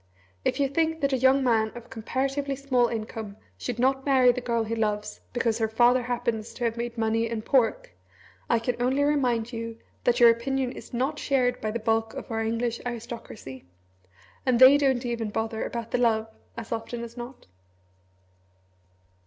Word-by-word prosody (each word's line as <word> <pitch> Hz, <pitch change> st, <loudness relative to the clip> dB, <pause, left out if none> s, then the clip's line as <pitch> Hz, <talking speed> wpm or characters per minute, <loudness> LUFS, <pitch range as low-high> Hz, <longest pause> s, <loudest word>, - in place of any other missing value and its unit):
If -, -, 0 dB
you 280 Hz, -, +3 dB
think 320 Hz, +3 st, 0 dB
that 275 Hz, -1 st, +1 dB
a -, -, +3 dB
young 265 Hz, +2 st, +4 dB
man 220 Hz, -3 st, +2 dB
of 240 Hz, -1 st, -11 dB
comparatively 270 Hz, +5 st, -2 dB
small 260 Hz, -3 st, +2 dB
income 220 Hz, -2 st, -5 dB, 0.2 s
should 245 Hz, -2 st, -4 dB
not 265 Hz, +2 st, +2 dB
marry 260 Hz, -3 st, +5 dB
the 250 Hz, +1 st, -4 dB
girl 235 Hz, -2 st, 0 dB
he 220 Hz, +1 st, -4 dB
loves 210 Hz, -1 st, -2 dB
because 235 Hz, -2 st, 0 dB
her 220 Hz, -, +2 dB
father 240 Hz, +3 st, +4 dB
happens 235 Hz, -2 st, -3 dB
to 245 Hz, -, -5 dB
have 230 Hz, -1 st, 0 dB
made 235 Hz, 0 st, -4 dB
money 225 Hz, 0 st, +1 dB
in 225 Hz, -2 st, -3 dB
pork, 280 Hz, -, +1 dB, 0.6 s
I 235 Hz, -, +4 dB
can 240 Hz, +1 st, -2 dB
only 260 Hz, +3 st, +2 dB
remind 250 Hz, -5 st, +1 dB
you 230 Hz, 0 st, -5 dB, 0.3 s
that 245 Hz, -, +3 dB
your 235 Hz, -1 st, +9 dB
opinion 255 Hz, +2 st, -1 dB
is -, -, -11 dB
not 270 Hz, +5 st, -1 dB
shared 250 Hz, -3 st, +1 dB
by 215 Hz, -, -1 dB
the 220 Hz, -, -2 dB
bulk 225 Hz, 0 st, 0 dB
of -, -, -7 dB
our 225 Hz, 0 st, -1 dB
English 230 Hz, +1 st, -1 dB
aristocracy. 230 Hz, -, -7 dB, 0.8 s
And 250 Hz, -3 st, +2 dB
they 260 Hz, +2 st, +9 dB
don't 265 Hz, -3 st, +2 dB
even 230 Hz, -2 st, -2 dB
bother 220 Hz, +1 st, -2 dB
about 235 Hz, -1 st, -5 dB
the -, -, +1 dB
love, 225 Hz, -2 st, +2 dB, 0.3 s
as 230 Hz, -1 st, -7 dB
often 230 Hz, +1 st, -4 dB
as 235 Hz, 0 st, -9 dB
not. 245 Hz, +1 st, -9 dB
240 Hz, 180 wpm, -26 LUFS, 225-260 Hz, 0.8 s, your